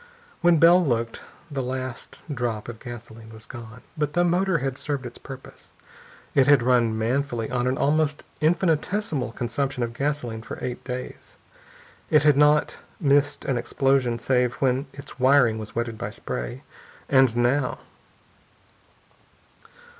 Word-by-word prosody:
When 175 -1 +5
Bell 175 +3 +6
looked, 115 -5 -1 0.3
the 135 -2 -2
last 130 -1 -5
drop 120 -4 -3
of 120 -2 -8
gasoline 115 -2 -10
was 110 0 -11
gone. 115 -1 -10
But 150 -2 -1
the 175 - +3
motor 180 +1 +2
had 135 -2 -3
served 140 -3 -3
its 120 - -9
purpose. 135 -1 -12 0.6
It 135 -1 +4
had 140 -4 +6
run 120 -3 +3
manfully 120 0 -1
on 125 0 0
an 130 +1 0
almost 150 0 +1 0.2
infinitesimal 160 - 0
consumption 125 +2 -2
of 115 0 -3
gasoline 125 -4 -2
for 115 - -8
eight 125 -1 -5
days. 125 0 -7 0.7
It 155 -1 +5
had 150 -2 +5
not 150 +1 +3 0.2
missed 145 -2 +2
an 130 -3 0
explosion 135 -2 +1
save 125 0 +1
when 130 +1 0
its 140 -1 -11
wiring 130 -4 +4
was 110 -1 -8
wetted 115 -1 -3
by - - -3
spray. 60 -1 -6 0.4
And 130 -4 +4
now.... 125 +2 +1
130 Hz, 140 wpm, -24 LUFS, 120-145 Hz, 0.7 s, Bell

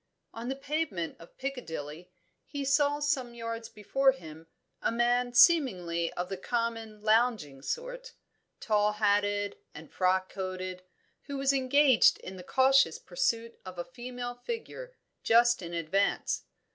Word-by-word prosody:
On 230 +2 -6
the 265 - -1
pavement 275 - -3
of 165 - -16
Piccadilly 175 - -6 0.4
he 285 -1 -4
saw 285 +2 +3
some 270 -5 -1
yards 230 -1 -5
before 265 +6 +2
him, 160 -8 -12 0.3
a - - +1
man 245 +1 +1
seemingly 180 - +4
of 180 0 -3
the 195 - -5
common 225 0 -3
lounging 215 - +2
sort, - - -5 0.5
tall 210 -1 +2
hatted 205 -1 +1 0.2
and 155 +1 -11
frock 185 0 +1
coated, 185 -1 -5 0.4
who 280 -1 -5
was 275 0 +2
engaged 270 -1 +5
in 190 - -8
the 185 - -9
cautious 270 +6 +4
pursuit 230 - -2
of 185 -1 -9
a 175 - -4
female 245 -1 -6
figure, 470 - -7 0.3
just 240 0 +4
in 170 -1 -7
advance. 170 +5 0
230 Hz, 135 wpm, -30 LUFS, 185-270 Hz, 0.5 s, engaged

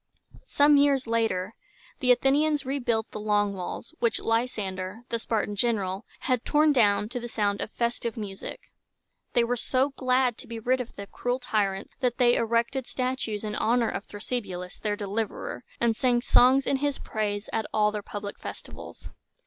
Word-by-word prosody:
Some 290 0 +5
years 280 -2 +4
later 225 -4 0 0.5
the 250 -3 +4
Athenians 285 +3 +3
rebuilt 240 -5 -1
the - - -5
Long 205 -1 +1
Walls, 190 - -6
which 235 - +2
Ly 225 +1 +2
san´der, 190 -3 -5
the 230 - -1
Spartan 215 -2 -1
general, 200 -3 0
had 255 -2 0
torn 300 0 +4
down 210 -5 +3
to 245 +1 -3
the 240 - -5
sound 205 -3 0
of - - -3
festive 235 0 -2
music. 200 -3 -6 0.7
They 240 - +4
were 240 +1 0
so 260 +3 +1
glad 255 -2 +1
to - - -11
be 230 - -6
rid 250 +3 +1
of 245 - -9
the 200 - -6
cruel 245 +5 -2
tyrants, 200 -6 -1
that 250 -2 0
they 240 -2 +5
erected 235 +3 +1
statues 255 -5 -2
in 210 -1 -3
honor 230 +2 +2
of - - -5
Thrasybulus, 200 -4 -5
their 210 -1 -1
deliverer, 210 +4 -3 0.2
and 235 -1 +2
sang 245 0 +2
songs 260 +2 +5
in 275 - +2
his 285 0 0
praise 205 -1 -3
at 220 -1 -1
all 210 -1 +3
their 210 0 -3
public 205 0 -6
festivals. - - -9
230 Hz, 175 wpm, -27 LUFS, 210-255 Hz, 0.7 s, Some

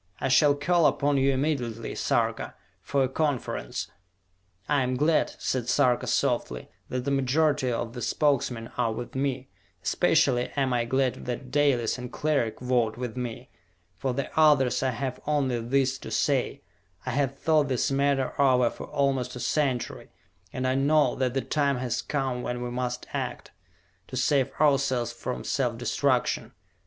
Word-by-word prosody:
I - - -1
shall 145 +2 +5
call 170 +3 +3
upon 145 0 +1
you 135 +1 +3
immediately, 130 -5 -2
Sarka, - - -1 0.3
for 140 -1 +1
a - - +2
conference!" 135 - -2 0.8
"I 145 -2 +2
am 130 0 0
glad," 155 +3 +2
said 125 -3 -2
Sarka 125 -4 +2
softly, 60 -1 -1 0.2
"that 125 0 -3
the 140 - 0
majority 140 0 +2
of 115 0 -3
the 125 - -6
Spokesmen 125 -4 0
are 115 -2 +2
with 120 +2 -6
me. 130 -1 -2 0.3
Especially 125 0 +2
am 135 -3 +1
I 120 -1 +1
glad 130 +1 0
that 125 +1 -5
Dalis 135 -5 +2
and 125 0 -7
Cleric 145 -7 0
vote 120 -3 0
with 125 -2 -5
me. 125 0 -6 0.4
For 135 - -2
the 135 +2 -3
others 145 -5 +4
I 130 - +1
have 130 +1 -3
only 135 -5 +1
this 135 +2 +1
to - - -8
say: - - 0 0.4
I - - -2
have 135 -1 0
thought 155 -2 +2
this 130 0 0
matter 135 -1 +1
over 125 -3 +4
for - - -8
almost 135 -3 0
a - - -6
century, 130 -1 -1 0.4
and 130 - -3
I 130 - +2
know 145 +3 +3
that 130 -1 -1
the 135 - +1
time 140 -2 0
has 125 -2 -2
come 135 -4 -2
when 125 0 -3
we 120 - -4
must 125 0 -3
act, - - -4 0.6
to 130 - -6
save 135 +1 +2
ourselves 135 -5 +2
from 125 +1 -5
self 120 -4 -1
destruction. 125 +1 0
130 Hz, 165 wpm, -27 LUFS, 125-140 Hz, 0.8 s, shall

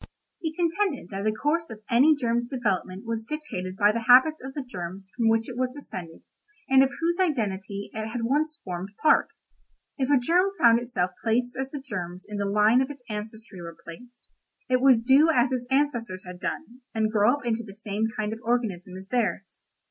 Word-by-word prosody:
He 320 -3 -2
contended 340 - 0
that 195 +1 -4
the 215 - +3
course 300 +9 -1
of 215 -1 -10
any 270 +6 +5
germ's 240 -3 0
development 210 -6 -2
was 225 -1 -3
dictated 190 -12 -5
by 205 +1 +5
the 230 +1 -3
habits 260 +6 +6
of 265 0 -7
the 285 - -3
germs 190 -4 -7
from 230 -2 +2
which 225 0 +2
it 250 - -7
was 255 +1 0
descended 180 - -8 0.4
and 265 0 +6
of 270 - +4
whose 340 +2 0
identity 205 - -1
it 220 0 -4
had 230 +1 -4
once 300 +5 0
formed 180 0 -5
part. 310 - +5 0.7
If 260 0 0
a 290 - +5
germ 355 +10 +2
found 235 -1 +6
itself 190 -7 -2
placed 245 +2 +1
as 265 0 -3
the 290 - -6
germs 185 -9 -6
in 210 -1 -5
the 200 0 -1
line 210 +5 +4
of 265 - -1
its 280 -3 -9
ancestry 215 -2 -6
were 170 -1 -9
placed, 245 +9 -12 0.4
it 255 -1 +2
would 255 -4 +5
do 275 +6 +6
as 255 -4 +3
its 250 -1 -2
ancestors 240 -9 0
had 180 0 -9
done, 250 - -5
and 220 -1 +1
grow 215 +4 +4
up 290 - -10
into 230 -1 0
the 200 -3 -11
same 210 +1 -2
kind 215 0 -1
of 225 - -8
organism 210 -7 -2
as 190 0 -10
theirs. 240 -3 -2
235 Hz, 200 wpm, -26 LUFS, 205-265 Hz, 0.7 s, habits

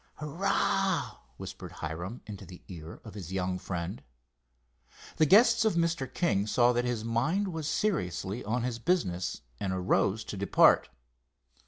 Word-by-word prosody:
"Hurrah!" 190 +2 0 0.2
whispered - - -8
Hiram, 90 +9 -5
into 105 -3 -8
the 90 -1 -12
ear 85 -2 -9
of 110 - -10
his 95 -4 -8
young 90 -1 -1
friend. 90 +3 -4 1.2
The 155 - +4
guests 220 - +6
of 220 -5 +2
Mr. 165 -6 0
King 105 - +1
saw 120 +2 +4
that 120 0 0
his 120 -3 -2
mind 150 - +1
was 160 -4 -4
seriously 110 - -1
on 115 +4 -1
his 120 -2 -2
business, 115 - 0 0.2
and 95 - -2
arose 95 +3 +1
to - - -6
depart. 100 - +4
120 Hz, 145 wpm, -30 LUFS, -, 1.2 s, guests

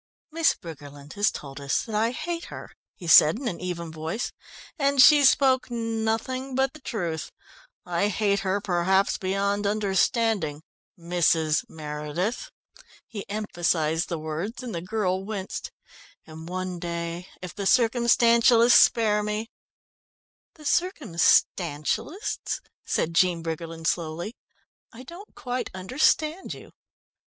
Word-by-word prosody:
"Miss 330 +1 +2
Briggerland 145 -3 -11
has 205 0 +2
told 140 -1 -8
us 140 0 0
that 225 - -8
I 220 +2 +2
hate 335 +7 -4
her," - - -9 0.2
he 180 - -11
said 160 +1 +7
in 260 0 -5
an 175 -7 -4
even 170 -2 -4
voice, 160 +8 -4 0.5
"and 280 -1 +1
she 290 +3 +8
spoke 265 -1 +4
nothing 230 +3 -2
but 265 0 +1
the 310 - -14
truth. 170 -11 -4 0.5
I 180 +3 0
hate 200 0 +1
her 195 +1 -1
perhaps 190 +1 +1
beyond 200 +2 0
understanding 200 -5 0 0.3
Mrs. 165 -2 +1
Meredith." 155 - -4 0.6
He 205 -4 -8
emphasised 175 -5 -1
the 170 - -2
words, 160 +10 -5
and 240 -4 -6
the 170 - -3
girl 185 -1 -1
winced. 195 -2 -5 0.6
"And 160 +1 -10
one 185 -1 -4
day, 170 +1 -4
if 180 -1 -8
the 200 -2 -3
Circumstantialists 235 0 +4
spare 210 -2 +3
me 210 +2 -3 0.5
" - - -88
"The 310 - -15
Circumstantialists," 220 - 0 0.2
said 165 - -1
Jean 170 -1 +2
Briggerland 165 0 -5
slowly. 170 +6 -2 0.6
"I 245 +2 -11
don't 345 +9 -12
quite 250 0 -4
understand 300 - 0
you." - - -14
200 Hz, 125 wpm, -25 LUFS, 170-235 Hz, 0.6 s, she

